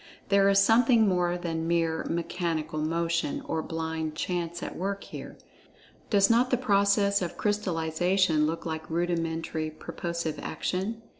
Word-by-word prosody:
There 200 0 +5
is 195 - +4
something 225 +2 +5
more 180 -2 +1
than 165 -2 -3
mere 165 -1 0
"mechanical 165 -2 -2
motion," 165 -1 -1
or 160 - -1
blind 160 -1 -3
chance 175 0 -3
at - - -5
work 195 +2 -3
here. - - -9 0.7
Does 200 -2 +5
not 235 +3 +3
the 250 - +2
process 200 -3 +3
of 175 - -4
crystallization 175 -4 +1
look 165 +1 -4
like 160 -1 -4
rudimentary 165 -2 -1
purposive 170 +1 -4
action? 195 +8 -3
170 Hz, 135 wpm, -28 LUFS, 160-200 Hz, 0.7 s, There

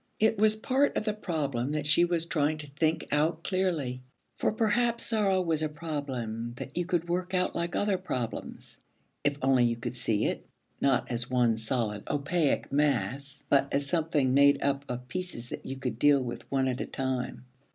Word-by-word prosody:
It 220 -1 +3
was 215 0 +5
part 265 +6 +1
of - - -1
the 215 - +1
problem 145 - -2
that 150 -1 -2
she 155 +4 +5
was 170 -1 0
trying 155 -2 +1
to 150 -1 -3
think 155 +3 0
out 160 +3 +1
clearly. 165 -10 -1 0.4
For - - +2
perhaps 230 +2 +1
sorrow 205 -4 +2
was 160 -3 0
a 155 - 0
problem 135 -8 -4
that 130 - -8
you 175 0 0
could 175 -2 0
work 180 +2 -1
out 180 0 +1
like 170 0 -2
other 205 -2 +1
problems, 125 - -5 0.4
if 145 -1 +1
only 130 -2 +4
you 120 0 +1
could 115 - -5
see 115 -4 0
it, - - -2 0.4
not 135 -3 +2
as 120 0 -2
one 120 -3 +3
solid, 110 -2 -2
opaque 145 +2 0
mass, 140 -1 0
but 140 0 +3
as 140 0 +1
something 155 -4 +1
made 140 +1 +5
up 140 0 0
of 125 0 -5
pieces 180 -10 -5
that - - -7
you 135 - -4
could 125 -3 -4
deal 145 -1 +5
with 120 -1 -6
one 135 -1 +2
at 130 0 -1
a - - -3
time. 130 -1 -3
145 Hz, 190 wpm, -29 LUFS, 130-175 Hz, 0.4 s, was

